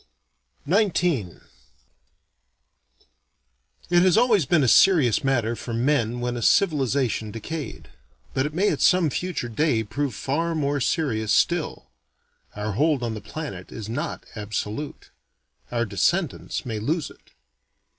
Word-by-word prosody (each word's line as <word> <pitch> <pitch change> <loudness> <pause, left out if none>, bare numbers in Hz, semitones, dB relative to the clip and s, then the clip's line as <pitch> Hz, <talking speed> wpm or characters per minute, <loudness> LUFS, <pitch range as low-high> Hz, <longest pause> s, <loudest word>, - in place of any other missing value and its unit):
XIX 170 - +1 2.5
It 175 0 +5
has 185 +2 +4
always 220 - +4
been 165 -5 +3
a - - +2
serious 145 - +5
matter 120 -4 +1
for 115 0 -5
men 120 -2 +1
when 120 0 -2
a 120 - -4
civilization 135 - +2
decayed. 140 +8 -6 0.5
But 130 +2 +1
it 150 - -8
may 200 +4 +2
at - - -3
some 180 -5 +4
future 180 -5 -3
day 120 0 +1
prove 125 +3 -3
far 165 +8 -1
more 145 -2 0
serious 115 -7 0
still. 155 - 0 0.6
Our 105 +1 -3
hold 145 +4 +1
on 115 -2 -2
the 105 - -6
planet 110 - -7
is 110 -2 -7
not 145 +9 -4
absolute. 105 +6 -5 0.6
Our 120 -1 0
descendants 105 - -1
may 110 -3 -3
lose 150 +7 -2
it. - - -21
135 Hz, 130 wpm, -24 LUFS, 110-160 Hz, 2.5 s, It